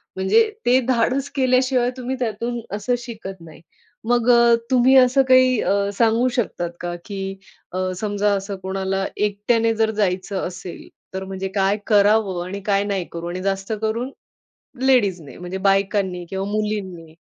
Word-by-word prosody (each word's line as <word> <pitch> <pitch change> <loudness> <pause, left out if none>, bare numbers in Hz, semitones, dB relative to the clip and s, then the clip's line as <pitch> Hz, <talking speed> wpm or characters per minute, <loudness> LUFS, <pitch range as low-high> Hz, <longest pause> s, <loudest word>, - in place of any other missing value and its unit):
म्हणजे 190 - +3 0.2
ते 250 +2 +5
धाडस 260 +3 +1
केल्याशिवाय 255 -2 +2
तुम्ही 255 +1 -3
त्यातून 235 0 -2 0.2
असं 215 +4 0
शिकत 220 -6 -8
नाही. 160 -2 -13 0.5
मग 240 0 +2
अ, 235 -1 +6 0.2
तुम्ही 255 +1 +5
असं 260 +1 +5
अ, - - +2
काही 255 -2 +5 0.3
सांगू 230 +3 +2
शकतात 175 -7 -2
का, 175 0 -4
की 195 -2 -5 0.4
अ, 185 +1 -2
समजा 205 0 0
असं 195 +1 -4
कोणाला 195 0 -2
एकट्याने 210 +3 +1
जर 220 0 +1
जायचं 190 0 -1
असेल, 180 0 -9 0.3
तर 190 0 -4
म्हणजे 190 0 -4
काय 195 +1 +2
करावं 205 -3 +3
आणि 200 +2 -6
काय 200 -1 +2
नाही 200 -3 -2
करू? 170 0 -6
आणि 180 +1 -4
जास्त 195 +1 -2
करून 230 +4 -2 0.7
लेडीजने 195 - +1
म्हणजे 180 +1 -6
बायकांनी 195 -2 +1
किंवा 190 0 -3
मुलींनी. 200 -6 -3
205 Hz, 150 wpm, -21 LUFS, 190-240 Hz, 0.7 s, अ